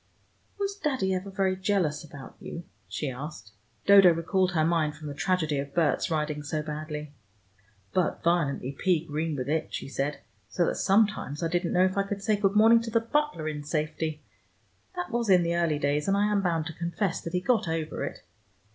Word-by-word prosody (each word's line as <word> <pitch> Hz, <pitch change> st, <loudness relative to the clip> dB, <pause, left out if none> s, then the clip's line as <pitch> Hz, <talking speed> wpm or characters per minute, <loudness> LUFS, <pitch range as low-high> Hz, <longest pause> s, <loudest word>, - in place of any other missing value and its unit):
"Was 400 Hz, 0 st, -2 dB
Daddy 265 Hz, -, 0 dB
ever 185 Hz, +2 st, -3 dB
very 190 Hz, -1 st, 0 dB
jealous 185 Hz, -6 st, 0 dB
about 145 Hz, -3 st, -11 dB
you?" 170 Hz, -, -7 dB, 0.2 s
she 130 Hz, -, -3 dB
asked. 125 Hz, -5 st, -8 dB, 0.3 s
Dodo 195 Hz, -3 st, +8 dB
recalled 180 Hz, +3 st, +1 dB
her 155 Hz, -2 st, +2 dB
mind 160 Hz, -3 st, +1 dB
from 155 Hz, -, -9 dB
the -, -, -5 dB
tragedy 160 Hz, -2 st, 0 dB
of 140 Hz, 0 st, -6 dB
Berts 160 Hz, -6 st, +2 dB
riding 150 Hz, -2 st, -1 dB
so 150 Hz, +1 st, -3 dB
badly. 150 Hz, -1 st, -5 dB, 0.8 s
"But 185 Hz, -2 st, 0 dB
violently 150 Hz, -6 st, +1 dB
pea 165 Hz, +2 st, +1 dB
green 155 Hz, 0 st, -2 dB
with 130 Hz, -2 st, -3 dB
it," 155 Hz, +2 st, -1 dB
she -, -, -5 dB
said, 140 Hz, +1 st, -3 dB, 0.3 s
"so 175 Hz, -, +1 dB
that -, -, -1 dB
sometimes 195 Hz, -7 st, +1 dB
I 165 Hz, -, +1 dB
didn't 175 Hz, 0 st, 0 dB
know 180 Hz, +1 st, +5 dB
if 185 Hz, +1 st, -1 dB
I 195 Hz, -, 0 dB
could 200 Hz, 0 st, -4 dB
say 215 Hz, +1 st, +3 dB
good 200 Hz, -1 st, +1 dB
morning 225 Hz, +2 st, +6 dB
to 230 Hz, -, -5 dB
the 230 Hz, +1 st, +3 dB
butler 230 Hz, -, -1 dB
in 150 Hz, -1 st, -4 dB
safety. 155 Hz, 0 st, -2 dB, 0.7 s
That 355 Hz, 0 st, -4 dB
was 235 Hz, -2 st, -1 dB
in 180 Hz, -2 st, +6 dB
the 170 Hz, 0 st, 0 dB
early 170 Hz, -3 st, +1 dB
days, 145 Hz, +1 st, 0 dB
and 195 Hz, 0 st, +3 dB
I 205 Hz, +1 st, +2 dB
am 205 Hz, -1 st, +2 dB
bound 165 Hz, -4 st, 0 dB
to 160 Hz, -, -5 dB
confess 170 Hz, +3 st, -2 dB
that 165 Hz, -, -6 dB
he 180 Hz, -, +2 dB
got 220 Hz, 0 st, +1 dB
over 160 Hz, -1 st, -2 dB
it. -, -, -6 dB
170 Hz, 200 wpm, -28 LUFS, 150-195 Hz, 0.8 s, Dodo